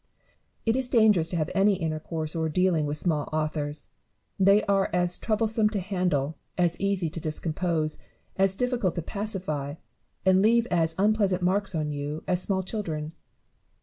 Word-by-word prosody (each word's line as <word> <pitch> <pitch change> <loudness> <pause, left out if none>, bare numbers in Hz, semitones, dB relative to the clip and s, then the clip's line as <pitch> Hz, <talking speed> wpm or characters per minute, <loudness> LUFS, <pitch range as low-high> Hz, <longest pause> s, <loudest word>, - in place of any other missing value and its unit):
It 225 0 +2
is 260 -1 0
dangerous 210 -9 +4
to 175 - -3
have 155 -1 -1
any 200 +1 +4
intercourse 160 -1 -3
or 160 -1 0
dealing 170 -2 +2
with 145 +1 -1
small 155 -3 0
authors. 155 -1 -2 0.5
They 195 +2 +5
are 195 -1 +1
as 180 0 +1
troublesome 220 0 +1
to 210 -2 -2
handle, 180 -6 -1 0.2
as 175 -2 +2
easy 195 -3 0
to 170 - -5
discompose, 155 0 -1 0.4
as 195 0 +3
diflicult 245 -6 0
to 170 - -3
pacify, 170 -9 -3 0.5
and 190 0 +5
leave 230 +2 +4
as 165 -2 +2
unpleasant 200 -2 +2
marks 195 +1 +1
on 155 -1 -1
you, 145 +2 -4
as 180 -1 +1
small 190 0 0
children. 160 -7 -4
180 Hz, 155 wpm, -27 LUFS, 155-200 Hz, 0.5 s, They